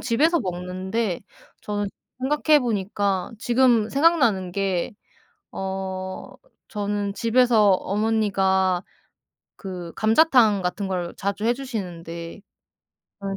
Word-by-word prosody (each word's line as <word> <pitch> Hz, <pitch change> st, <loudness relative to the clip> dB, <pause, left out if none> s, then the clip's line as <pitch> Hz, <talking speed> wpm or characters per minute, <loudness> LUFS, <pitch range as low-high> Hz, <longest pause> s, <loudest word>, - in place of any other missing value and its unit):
집에서 295 Hz, +8 st, +2 dB
먹는데 185 Hz, +2 st, -3 dB, 0.4 s
저는 205 Hz, -1 st, -3 dB, 0.6 s
생각해 300 Hz, -, +8 dB
보니까 200 Hz, -4 st, -1 dB
지금 240 Hz, -2 st, +3 dB
생각나는 255 Hz, -, +2 dB
게 190 Hz, -2 st, -1 dB, 0.6 s
어 190 Hz, -1 st, -5 dB, 0.3 s
저는 205 Hz, -1 st, -3 dB
집에서 230 Hz, -2 st, +4 dB
어머니가 195 Hz, -3 st, +1 dB, 0.8 s
그 180 Hz, -4 st, -7 dB
감자탕 220 Hz, -3 st, +4 dB
같은 190 Hz, +2 st, -2 dB
걸 180 Hz, -2 st, -3 dB
자주 200 Hz, +2 st, -3 dB
해 235 Hz, +2 st, +3 dB
주시는데 175 Hz, -9 st, -6 dB, 0.8 s
저는 195 Hz, 0 st, -4 dB
200 Hz, 210 characters per minute, -23 LUFS, 185-230 Hz, 0.8 s, 생각해